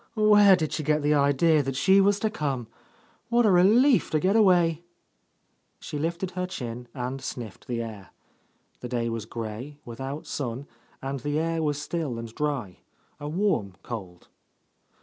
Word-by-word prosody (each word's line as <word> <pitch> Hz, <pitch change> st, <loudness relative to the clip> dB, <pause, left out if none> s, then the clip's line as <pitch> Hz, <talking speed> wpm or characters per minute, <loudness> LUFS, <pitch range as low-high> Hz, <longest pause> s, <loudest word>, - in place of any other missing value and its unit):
Where 210 Hz, -2 st, +6 dB
did 160 Hz, -4 st, -2 dB
she -, -, -1 dB
get 150 Hz, 0 st, +1 dB
the 150 Hz, +1 st, +3 dB
idea 145 Hz, +2 st, +3 dB
that 135 Hz, -1 st, -3 dB
she 190 Hz, +9 st, +5 dB
was 200 Hz, +1 st, +3 dB
to 220 Hz, -, 0 dB
come? 140 Hz, -, -2 dB, 0.6 s
What 240 Hz, 0 st, +3 dB
a 210 Hz, -, +5 dB
relief 220 Hz, +9 st, +5 dB
to 155 Hz, -, +1 dB
get 190 Hz, +6 st, +2 dB
awayl" 175 Hz, -7 st, +4 dB, 1.0 s
She 150 Hz, -, -6 dB
lifted 170 Hz, +4 st, -2 dB
her 180 Hz, 0 st, -3 dB
chin 125 Hz, -8 st, -6 dB
and 130 Hz, +1 st, -4 dB
sniffed 120 Hz, -5 st, -7 dB
the 115 Hz, -1 st, -2 dB
air. 105 Hz, -4 st, -9 dB, 0.7 s
The 125 Hz, -, -7 dB
day 120 Hz, -1 st, -1 dB
was 115 Hz, -2 st, -4 dB
grey, 115 Hz, +6 st, -6 dB
without 135 Hz, +5 st, -6 dB
sun, 130 Hz, -1 st, -4 dB, 0.4 s
and 135 Hz, 0 st, -3 dB
the 145 Hz, +4 st, -2 dB
air 165 Hz, +1 st, 0 dB
was 145 Hz, -2 st, -1 dB
still 150 Hz, -5 st, -3 dB
and 115 Hz, -1 st, -7 dB
dry, 140 Hz, -, -3 dB, 0.4 s
a 145 Hz, 0 st, -5 dB
warm 160 Hz, -, 0 dB
cold. 95 Hz, -7 st, -8 dB
145 Hz, 165 wpm, -26 LUFS, 120-180 Hz, 1.0 s, Where